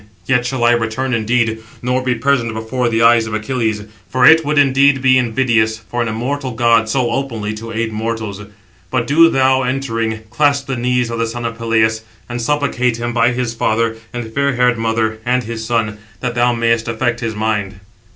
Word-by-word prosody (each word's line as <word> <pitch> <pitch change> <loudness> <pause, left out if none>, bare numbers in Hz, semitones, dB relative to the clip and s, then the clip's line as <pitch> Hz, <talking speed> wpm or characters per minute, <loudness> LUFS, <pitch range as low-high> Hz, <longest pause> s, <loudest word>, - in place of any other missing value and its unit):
Yet 125 -2 +1
shall 130 -1 -2
I 120 - +5
return 120 +2 -1
indeed, 115 0 0 0.2
nor 125 +1 0
be 130 -1 0
present 115 -2 0
before 120 +2 -2
the 115 0 +1
eyes 115 -1 +5
of 110 - -3
Achilles; 110 -2 -2 0.3
for 130 -1 +2
it 160 +3 +7
would 150 0 -1
indeed 140 0 +4
be 130 0 +4
invidious 115 -2 +1
for 115 +2 -5
an 120 - -1
immortal 130 +4 -3
god 115 -1 +2
so 125 -1 0
openly 115 -6 -3
to 115 +1 -8
aid 115 0 -2
mortals. 110 -2 -4 0.5
But - - 0
do 165 +4 +5
thou, 130 -2 +2
entering, 115 -4 -2
clasp 140 +1 +1
the 135 - -3
knees 125 -1 0
of 115 - -4
the 115 - 0
son 120 +1 -5
of 115 0 -3
Peleus, 110 -1 +1 0.3
and 120 0 -4
supplicate 125 -3 0
him 120 +1 -3
by 120 +1 +3
his 120 -1 -2
father, 115 0 0 0.2
and 115 -2 -6
fair 140 0 0
haired 125 -1 +2
mother, 110 -1 -1
and 125 +1 0
his 115 0 -5
son; 110 -3 -1 0.2
that 125 +4 -3
thou 120 0 +2
mayest 115 -1 0
effect 115 +1 -1
his 115 -3 -3
mind." 105 -3 -2
120 Hz, 195 wpm, -17 LUFS, 110-125 Hz, 0.5 s, it